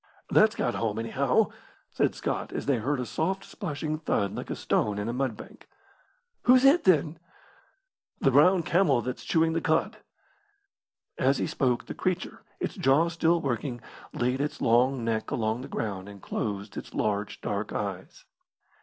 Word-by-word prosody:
"That's - - +5
got - - 0
home, 110 -2 -2
anyhow," 115 0 +1 0.4
said - - +1
Scott, - - -3
as - - -4
they 140 -3 +2
heard 130 +5 -1
a 125 - -2
soft, 190 +9 -2
splashing 155 -5 -4
thud 100 -10 0
like - - -6
a - - -2
stone 105 -1 0
in 105 +1 -3
a 115 - -2
mud 125 -4 -1
bank. 215 +4 -13 0.8
"Who's 255 +1 +6
hit, 285 +6 +5
then?" 160 -3 +3 1.0
"The 135 - +3
brown 170 +7 +5
camel 165 -7 +2
that's 125 - -5
chewing 160 0 +2
the 165 - 0
cud." 160 0 +1 1.2
As 135 +2 +3
he - - 0
spoke 125 -3 0
the - - -6
creature, - - -3 0.2
its - - -2
jaw 145 +6 +3
still 170 0 +2
working, 125 -1 -2 0.3
laid 125 +3 -1
its 150 - -3
long 120 +1 +2
neck 110 -1 -1
along 110 +1 -1
the - - -7
ground 100 -3 -4
and 100 -1 -11
closed 100 0 -4
its - - -8
large 105 -1 -1
dark 100 +1 -3
eyes. 100 -3 -5
130 Hz, 165 wpm, -27 LUFS, 110-160 Hz, 1.2 s, Who's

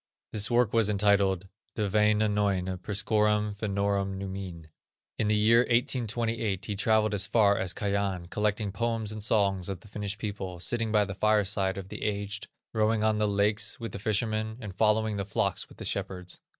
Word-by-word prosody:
This 105 -1 0
work 120 -2 +2
was 115 -2 +3
entitled: 100 -2 +2 0.3
De 105 -2 0
Wainainoine 105 -3 +1
priscorum 105 +1 +1
Fennorum 100 -1 -1
numine. 95 -4 -6 0.5
In 110 - +1
the 105 - +3
year 110 +2 +5
1828, 115 -5 0
he 105 - -3
travelled 110 +1 +2
as 100 -1 +1
far 105 -3 +4
as 95 -2 -1
Kajan, 100 -3 -1
collecting 105 -1 0
poems 115 0 -1
and 110 0 -6
songs 100 -4 +1
of 95 -3 -5
the - - -15
Finnish 105 -1 -4
people, 100 -5 -5
sitting 115 +4 -1
by 105 -1 +4
the 100 - -5
fireside 100 -2 +1
of 95 -1 -7
the - - -7
aged, 100 0 -3 0.3
rowing 110 0 +2
on 110 -1 +2
the 105 - +2
lakes 105 +2 +1
with 115 -1 -5
the - - -6
fishermen, 110 +1 -1
and 105 -6 -7
following 110 0 +2
the 100 - -1
flocks 100 -1 -1
with - - -16
the - - -7
shepherds. 90 -1 -3
105 Hz, 175 wpm, -28 LUFS, 100-110 Hz, 0.5 s, year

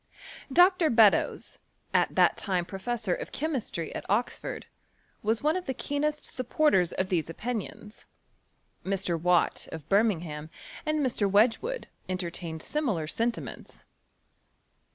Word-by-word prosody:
Dr. 355 +1 +5
Beddoea, 225 -5 +3 0.3
at - - +2
that - - +5
time 185 -4 -1
professorofchemistry 220 - -3
at - - -4
Oxford, 215 +5 -1 0.6
was 220 +3 0
one 305 +2 +3
of 365 -2 -4
the 265 - -2
keenest 295 +3 -2
supporters 255 - +2
of 185 0 -1
these 170 -4 0
opinions. 215 +2 -6 0.8
Mr.Watt, 180 -2 +1
of 160 -2 -8
Birmingham, 170 -8 +1 0.4
and 305 0 +1
Mr. 220 -5 +1
Wedge 220 +4 +4
wood, - - -4 0.2
entertained 170 -3 -4
similar 235 - -1
sentiments. 230 +9 -4
210 Hz, 110 wpm, -28 LUFS, 180-265 Hz, 0.8 s, Dr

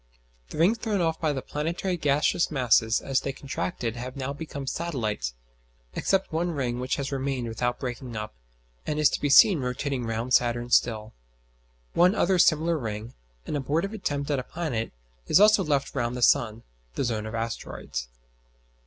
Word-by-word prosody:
The - - -8
rings 190 +9 +3
thrown 215 -4 -1
off 165 -2 0
by 155 -2 +2
the 135 -2 -3
planetary 170 +5 -2
gaseous 150 +1 +2
masses 120 -5 +3
as 135 -1 +1
they 135 - -2
contracted 135 -3 -4
have 125 +2 -6
now 135 0 -3
become 145 -2 -6
satellites; 115 - -2 0.6
except 195 -4 0
one 170 +2 0
ring 125 -4 -2
which 130 +1 -1
has 140 0 -3
remained 135 -3 -2
without 120 +2 -2
breaking 125 -2 -5
up, 105 0 -5 0.5
and 150 - -1
is 150 -1 +4
to - - -2
be 145 - +1
seen 175 +5 +7
rotating 125 0 -2
round 115 +3 -2
Saturn 120 0 +2
still. 110 -3 +2 0.8
One 180 +4 +4
other 185 -2 +2
similar 165 -1 +3
ring, 110 -1 -5 0.3
an - - -3
abortive 155 +9 -1
attempt 145 -8 -2
at 140 - +1
a - - -4
planet, 135 -8 -3 0.4
is - - +5
also 210 -1 +6
left 145 -4 0
round 120 +1 -1
the 125 - -1
sun 115 -1 +3 0.3
(the - - 0
zone 110 -3 -2
of 110 - -5
asteroids). 115 - -4
135 Hz, 170 wpm, -26 LUFS, 120-160 Hz, 0.8 s, seen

